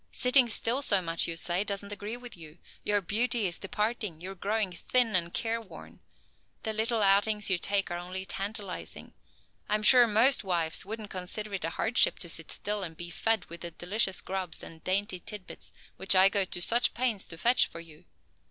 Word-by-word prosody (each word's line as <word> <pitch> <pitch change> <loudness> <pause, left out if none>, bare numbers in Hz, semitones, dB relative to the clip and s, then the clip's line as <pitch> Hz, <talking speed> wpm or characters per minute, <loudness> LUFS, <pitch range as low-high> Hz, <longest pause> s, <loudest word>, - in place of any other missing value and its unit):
"Sitting 250 -1 +5
still 230 +4 0
so 205 -8 +4
much, 165 -2 0
you 165 - -3
say, 175 +3 0
doesn't 200 0 -3
agree 205 +3 -6
with 245 -1 -10
you. 160 -1 -14 0.3
Your 205 -1 +1
beauty 230 +4 0
is 175 -2 -3
departing! 210 -3 -3
You 185 +3 -7
are - - -7
growing 200 +1 -1
thin 225 +5 +2
and 170 -1 +1
careworn! 225 0 -5 0.6
The 220 - -2
little 220 0 +1
outings 205 +1 +3
you 180 - +2
take 200 0 -1
are 175 - -3
only 185 +2 -6
tantalizing. 200 0 -3 0.6
I 210 - +2
am 215 - -2
sure 245 +2 +8
most 230 +5 +3
wives 170 -4 0
wouldn't 215 +1 -7
consider 200 +3 -5
it 190 -4 -3
a - - -2
hardship 225 +7 +2
to 170 - -3
sit 165 -1 -2
still 210 0 -2
and 165 -4 -7
be 175 0 -7
fed 225 +5 0
with 170 0 -10
the 170 - -5
delicious 185 +3 -1
grubs 185 -2 -5
and 160 -1 -11
dainty 190 0 -1
tidbits 205 +1 -7 0.3
which 190 0 +2
I 190 +1 +7
go 200 -1 +1
to 175 - -5
such 240 +5 +3
pains 235 -5 -1
to 165 - -9
fetch 240 +8 +3
for 165 - -10
you. 165 0 -15
200 Hz, 200 wpm, -29 LUFS, 175-220 Hz, 0.6 s, sure